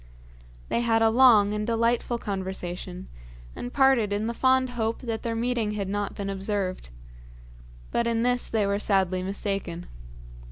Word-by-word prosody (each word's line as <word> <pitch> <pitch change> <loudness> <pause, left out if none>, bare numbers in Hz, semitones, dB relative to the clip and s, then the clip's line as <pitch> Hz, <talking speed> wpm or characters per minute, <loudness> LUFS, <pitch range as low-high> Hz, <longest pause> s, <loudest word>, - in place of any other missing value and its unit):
They - - +1
had 225 -1 +2
a 225 - +4
long 225 -4 +6
and 210 0 -2
delightful 235 +1 +1
conversation, 190 -3 -5 0.5
and 245 - -6
parted 265 -7 +3
in 205 +2 -1
the 235 - -2
fond 260 +1 +2
hope 225 -2 -2
that 225 -3 -3
their 230 -1 -2
meeting 230 -2 -1
had 200 -2 -3
not 205 +1 -3
been 200 - -4
observed. 195 - -3 1.0
But 235 - +1
in 230 0 +1
this 245 0 +1
they 220 -2 +1
were 200 0 0
sadly 190 -3 +1
mistaken. 195 -2 -3
215 Hz, 155 wpm, -26 LUFS, 195-235 Hz, 1.0 s, long